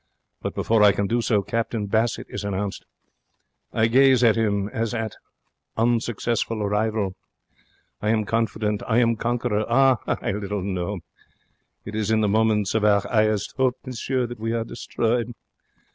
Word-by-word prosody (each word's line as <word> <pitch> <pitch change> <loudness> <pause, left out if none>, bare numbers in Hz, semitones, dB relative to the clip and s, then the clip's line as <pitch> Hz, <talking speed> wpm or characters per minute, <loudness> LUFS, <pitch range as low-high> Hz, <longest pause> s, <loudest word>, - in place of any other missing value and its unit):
But, - - -4
before 115 -1 +2
I 105 -1 +7
can 100 - -1
do 120 +4 0
so, 105 -3 +1
Captain 115 -1 -2
Bassett 110 +3 0
is - - -6
announced. 100 0 -3 0.9
I 110 - +2
gaze 130 +1 +5
at 115 -2 +5
him 100 -3 0
as 115 +1 -2
at 110 -2 -3 0.6
unsuccessful 115 -1 0
rival. 105 -1 0 0.9
I 105 - 0
am 110 -1 +2
confident. 105 -1 -1
I 115 - +2
am 115 -1 +3
conqueror. 120 -2 -1
Ah, 130 -1 +4
I - - -1
little 100 -1 -3
know! 95 0 -3 0.8
It 105 - -7
is 110 -1 -1
in 110 0 +3
the 105 - +2
moments 105 -1 +2
of 110 -1 +1
our 100 -1 +4
highest 110 -1 0
'ope, 130 -1 +2
monsieur, 130 0 -2
that 120 -1 -8
we 115 +1 -2
are 115 -1 0
destroyed. 120 +1 -2
110 Hz, 160 wpm, -24 LUFS, 105-115 Hz, 0.9 s, I